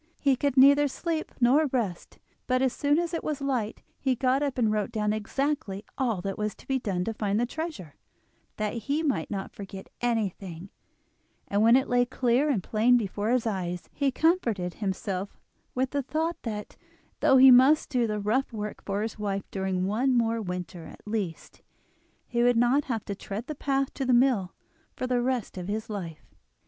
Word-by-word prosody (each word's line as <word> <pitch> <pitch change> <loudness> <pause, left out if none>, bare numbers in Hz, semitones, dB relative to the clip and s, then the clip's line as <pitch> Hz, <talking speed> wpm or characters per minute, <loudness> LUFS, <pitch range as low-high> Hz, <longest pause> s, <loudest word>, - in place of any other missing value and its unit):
He 275 -2 +3
could 280 +1 -1
neither 285 +2 +7
sleep 320 +3 -3
nor 270 +5 +4
rest; 225 -10 -3 0.3
but 255 0 +2
as 260 -2 +2
soon 290 +1 +2
as 345 0 -1
it 330 - -2
was 300 -2 -2
light 255 -6 -2 0.2
he 265 -2 +1
got 260 +2 +1
up 280 -3 -1
and 225 -3 +2
wrote 210 +1 -1
down 210 -2 0
exactly 215 -2 -2
all 230 -9 0
that 195 +2 -4
was 210 0 -2
to - - -18
be 270 -1 +1
done 190 -6 -2
to 225 - -2
find 210 -1 -1
the 240 - +2
treasure, 295 - -6 0.6
that 215 -1 -1 0.2
he 300 +3 +1
might 285 -4 0
not 195 -2 -4
forget 195 -1 -9
anything, 195 -6 -2 0.8
and 200 +1 +1
when 230 +2 +6
it 265 +1 +3
lay 245 0 +3
clear 250 +3 +1
and 220 -11 0
plain 235 +3 +3
before 210 -1 -2
his 250 -1 +2
eyes 180 -5 -3
he 280 -1 +1
comforted 235 - +1
himself 195 -1 -3 0.4
with 260 +1 0
the 285 - 0
thought 320 +5 -2
that, 210 -3 -6 0.4
though 265 - +5
he 260 0 +9
must 265 +5 +6
do 245 -4 +2
the 210 -1 -2
rough 225 +7 0
work 210 -2 -6
for 200 +1 -2
his 220 -1 -5
wife 200 -2 -2
during 190 -1 -1
one 245 +6 +1
more 230 -1 +1
winter 180 -3 -5
at - - -14
least, 210 -6 -4 0.6
he 235 -1 -1
would 245 -1 +4
not 245 +5 +3
have 230 -5 -3
to 200 - -3
tread 200 +3 -6
the 305 - -5
path 275 -1 -1
to 270 - -3
the 255 -1 +2
mill 240 -7 +3 0.4
for - - -3
the 250 -1 +1
rest 245 -6 -2
of 180 - -6
his 215 +2 -3
life. 170 -6 -7
235 Hz, 195 wpm, -27 LUFS, 205-265 Hz, 0.8 s, he